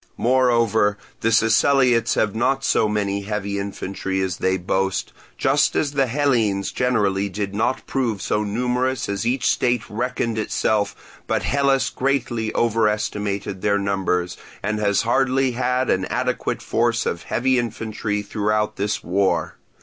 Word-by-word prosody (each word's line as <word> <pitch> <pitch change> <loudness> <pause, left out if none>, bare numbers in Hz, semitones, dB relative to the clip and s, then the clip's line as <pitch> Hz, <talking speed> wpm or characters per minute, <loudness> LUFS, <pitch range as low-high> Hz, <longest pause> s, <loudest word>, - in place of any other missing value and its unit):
Moreover, 115 -4 +2 0.2
the 115 - +1
Siceliots 120 +2 +3
have 105 -2 +1
not 135 +4 0
so 110 - +2
many 100 -1 -1
heavy 100 -1 -3
infantry 95 -1 -4
as 95 -2 -1
they 95 0 +1
boast; 95 +1 -1 0.2
just 140 +2 +2
as 145 - +1
the 135 -2 +1
Hellenes 115 -7 +1
generally 100 -6 +1
did 100 +1 -4
not 110 +5 -1
prove 120 -6 -1
so 105 +3 -1
numerous 125 +4 -1
as 100 +3 -2
each 125 +2 +1
state 120 -1 +1
reckoned 115 0 -2
itself, 105 -1 -2
but - - 0
Hellas 140 -1 +2
greatly 120 -5 -1
over 115 -2 +2
estimated 105 -2 -2
their 100 -1 +2
numbers, 95 -3 -1 0.3
and 105 0 -1
has 100 0 +2
hardly 130 +2 +2
had 125 +1 0
an 95 0 +1
adequate - - -2
force 115 +1 +1
of 85 - -2
heavy 130 +1 +1
infantry 110 -2 -3
throughout 105 +1 -1
this 105 +2 -2
war. 95 +3 0
110 Hz, 140 wpm, -22 LUFS, 100-125 Hz, 0.3 s, Siceliots